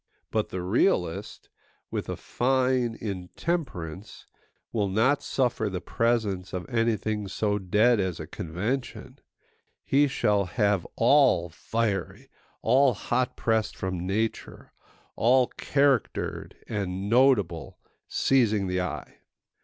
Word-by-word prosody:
But 110 -1 0
the 90 -1 -4
realist, 90 - 0 0.4
with - - -3
a - - -2
fine 125 -2 0
intemperance, 95 - -4 0.5
will 105 -3 0
not 115 +9 +2
suffer 120 -5 0
the 95 -2 -3
presence 105 -4 -1
of 90 -2 -4
anything 110 -3 0
so 105 +2 -1
dead 105 +5 +3
as 95 -3 -1
a 80 - -5
convention; 100 - -4 0.6
he 145 +2 +3
shall 105 -6 +1
have 100 -1 0
all 125 - +4
fiery, 100 +2 -3 0.3
all 130 -2 +4
hot 125 +4 -1
pressed 110 -1 0
from 90 -1 -3
nature, 110 +3 -3 0.4
all 125 +2 +3
charactered 140 -4 0
and 100 -2 -3
notable, 115 -8 +2 0.3
seizing 110 -7 +2
the 90 0 -1
eye. 90 - -6
110 Hz, 110 wpm, -27 LUFS, 95-125 Hz, 0.6 s, all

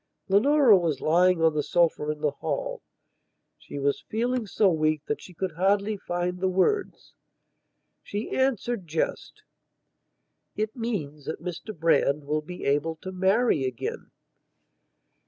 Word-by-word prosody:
Leonora 250 +4 +6
was 165 -7 0
lying 175 +1 +3
on 160 -1 +4
the 150 - 0
sofa 165 -1 +1
in 150 0 -3
the 150 -2 +1
hall; - - -4 0.8
she - - -9
was 140 0 0
feeling 240 +1 -1
so 205 +1 +2
weak 155 -3 +1
that 145 - -3
she - - -12
could 185 +1 -3
hardly 200 +5 +1
find 180 -1 -3
the 190 0 +1
words. 285 - 0 0.9
She 205 +2 -5
answered 240 -6 0
just: 160 - -3 1.1
"It 215 0 -2
means 160 - -4
that 160 - -4
Mr 180 +4 -7
Brand 150 -3 +2
will 150 +2 -1
be 180 +4 -8
able 145 +4 +1
to 185 +4 -8
marry 190 - +2
again." 130 -3 -4
180 Hz, 135 wpm, -26 LUFS, 155-215 Hz, 1.1 s, Leonora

